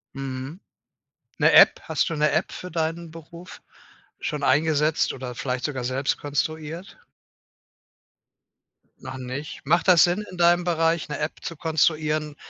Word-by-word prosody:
Mhm. 135 +4 -6 0.8
'Ne - - +3
App, - - +7
hast - - -1
du 165 - -3
'ne 150 0 +3
App - - 0
für 180 -2 -8
deinen 165 0 -3
Beruf 170 +2 -12 0.6
schon 150 -1 -4
eingesetzt 155 +1 +2
oder 125 -2 -7
vielleicht 125 -1 -3
sogar 135 -4 -3
selbst 130 +2 -1
konstruiert? 155 +5 -4 2.0
Noch 130 0 -7
nicht. 130 +4 -7
Macht 170 +6 +1
das 180 -3 +7
Sinn, 180 +4 +1
in 185 - -10
deinem 175 0 +3
Bereich 165 -1 +1
'ne 150 - -4
App 150 +1 -4
zu 165 - -6
konstruieren 155 -1 0
155 Hz, 140 wpm, -24 LUFS, 140-170 Hz, 2.0 s, App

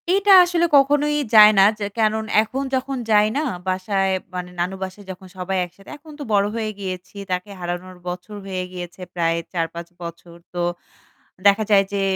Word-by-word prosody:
এইটা 395 +2 +3
আসলে 350 -1 +1
কখনোই 290 +2 +3 0.2
যায় 210 0 +10
না - - +8 0.2
যে 205 - -2
কেনন 220 0 +1 0.2
এখন 255 +5 -3
যখন 265 +1 -2
যায় 210 0 +5
না - - +1 0.3
বাসায় 190 +1 0 0.2
মানে 180 0 -4
নানু 180 +2 -1
বাসায় 190 +2 -8
যখন 185 0 -11
সবাই 185 +1 -2
একসাথে, 195 +3 -17
এখন 305 +1 -15
তো - - -4
বড় 200 -1 +4
হয়ে 220 -2 -2
গিয়েছি 185 -1 -6 0.2
তাকে 180 +2 -2
হারানোর 175 +1 -5
বছর 180 +4 -6
হয়ে 185 -1 -3
গিয়েছে 180 0 -8
প্রায় 165 -1 0 0.2
৪-৫ 170 0 -3
বছর। 170 0 -9 0.2
তো 175 - -2 0.9
দেখা 200 +2 +4
যায় 200 -1 +6
যে 200 - 0
195 Hz, 175 wpm, -21 LUFS, 180-220 Hz, 0.9 s, যায়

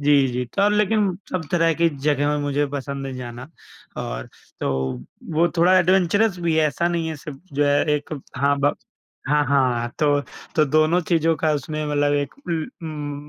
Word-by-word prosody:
जी, 145 -1 +4
जी 125 +1 -2
तो 200 +1 +4
लेकिन 210 -2 +2 0.2
सब 180 -3 -2
तरह 165 -1 +3
की 170 +1 +3 0.2
जगह 145 0 +2
में 150 - +1
मुझे 145 0 0
पसंद 140 0 -5
है 135 - -5
जाना 125 +2 -7 0.5
और - - -5 0.3
तो - - 0 0.6
वो 170 +2 +4
थोड़ा 180 +3 +5
एडवेंचरअस 185 +3 +3
भी 165 -2 +1
है। 155 - +4
ऐसा 170 +3 0
नहीं 170 -2 -1
है 160 - -4
सिर्फ 140 -1 -9
जो 145 +1 +2
है 145 0 +3
एक 150 +1 -3 0.2
हाँ 140 +2 +2
ब 145 +1 +2 0.5
हाँ, 150 0 +3
हाँ 125 -3 +2
तो 145 -2 +3 0.4
तो 155 - +5
दोनों 155 +4 +3
चीज़ों 165 -1 +3
का 155 +1 +1
उसमें 155 +2 -3
मतलब 145 -1 +1
एक 145 -1 -1
उम, 155 - -5
150 Hz, 180 wpm, -22 LUFS, 140-170 Hz, 0.6 s, थोड़ा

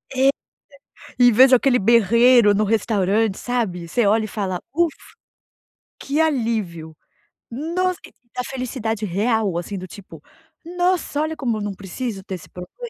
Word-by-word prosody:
É, 265 +1 +4 0.9
e 245 -1 +6
vejo 260 +3 +6
aquele 250 0 +3
berreiro 235 +1 +5
no 210 +2 +1
restaurante, 215 -1 0
sabe. 205 -9 -3
Você 235 +6 0
olha 215 +2 +2
e - - -6
fala: 190 -4 -3
“Ufa, 335 -1 +2 1.1
que 285 +3 -2
alívio”. 220 - -1 0.6
Nossa, 355 - -2 0.4
a 250 - -1
felicidade 230 -5 -4
real, 205 -1 0
assim, 195 +3 -5
do 185 0 -7
tipo: 200 +2 -13 0.4
“Nossa, 355 -3 -1
olha 315 +1 -2
como 235 -7 -2
eu - - -5
não 205 -1 -3
preciso 195 +2 -6
ter 190 -2 -6
esse 175 - -12
problema”. 325 - -9
225 Hz, 145 wpm, -21 LUFS, 200-260 Hz, 1.1 s, e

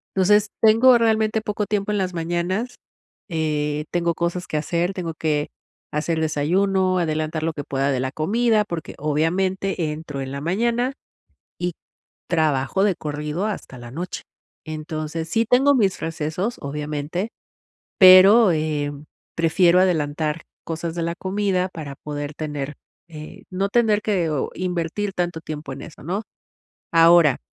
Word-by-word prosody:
Entonces 210 +2 +4
tengo 230 +3 +6
realmente 220 -1 +2
poco 210 0 -2
tiempo 205 0 -1
en 210 - 0
las 185 -1 -1
mañanas, 175 +8 -2 0.5
eh, 150 -2 -1
tengo 170 -1 +1
cosas 175 +2 -2
que 155 - -2
hacer, 170 +4 -1
tengo 175 -3 -4
que 150 -2 0 0.4
hacer 160 +2 -1
el - - 0
desayuno, 185 +5 +1
adelantar 155 -1 -1
lo 165 - 0
que 145 - -5
pueda 135 +1 0
de 130 - 0
la 130 0 -2
comida, 215 - +2
porque, 170 -5 -6
obviamente, 170 +3 0
entro 150 -3 -6
en 135 0 -5
la 140 0 -5
mañana 235 - 0 0.7
y 175 0 -1 0.6
trabajo 155 +2 +1
de 200 -3 +2
corrido 150 +4 -3
hasta 200 -10 -5
la 120 -1 -10
noche. 175 +5 -5 0.4
Entonces, 155 +1 -5
sí 225 +7 +2
tengo 270 +3 +5
mis 200 -7 +1
recesos, 165 +7 -3
obviamente, 150 +7 -3 0.7
pero, 195 +3 +8
em, 150 -2 -2 0.3
prefiero 170 +2 +4
adelantar 155 -3 0 0.2
cosas 165 0 -4
de 170 - -2
la 170 0 -1
comida 190 -1 0
para 150 -5 -7
poder 145 0 -6
tener, 150 -2 -4 0.3
eh, 155 -2 -10
no 190 +2 -1
tener 220 -2 +3
que 185 -7 0 0.2
invertir 180 +3 -2
tanto 175 -2 -2
tiempo 155 -3 -6
en 135 - -8
eso, 160 - -11
¿no? 190 +7 -2 0.7
Ahora 165 -4 +6
170 Hz, 145 wpm, -22 LUFS, 150-195 Hz, 0.7 s, pero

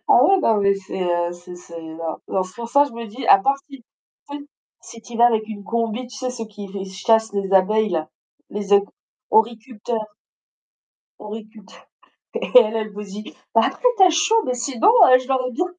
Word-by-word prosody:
Ah - - +6
ouais, 390 -1 +4 0.2
mais 200 0 +3
c'est, 190 -1 -6
heu, 175 -1 -1
c'est 175 0 -12
c'est 170 -1 -11
non, 160 +3 -4
c'est 185 - -11
pour 235 -1 -7
ça, 285 +3 +4
je 280 - -9
me 230 0 -7
dis: 230 +5 -8
«À 195 - +8
part 275 +7 +1
si 275 -1 -11
tu 235 - -23 0.5
sais? 285 0 -7 0.4
Si 230 - -13
tu 235 +1 -13
y - - -4
vas 235 +1 +6
avec 220 -2 +1
une 205 -2 -8
combi», 230 +2 -2
tu 245 - -12
sais? 255 -1 -3
Ceux 230 -3 -7
qui 205 -1 -10
v 195 0 -6
chassent 220 +3 0
les 195 -1 -3
abeilles, 210 +2 +3
là, 160 -2 -2 0.4
les 205 -1 -4
éco 200 0 +2 0.4
horticulteurs. 225 0 -1 1.2
horticulteurs 215 0 -11 0.5
et - - -3
elle, 225 -2 +5
elle 215 -1 -3
vous 210 - -7
dit: 205 +1 -10 0.2
«Bah, 225 - +6
après, - - -5
tu 380 - +6
as 360 - +5
chaud, 440 +8 +2
mais 250 - -1
sinon, 250 - -1
heu, 345 - +7
je 255 - -12
l'aurais 255 -1 -1
bien» 355 +9 -1
220 Hz, 210 wpm, -21 LUFS, 200-250 Hz, 1.2 s, À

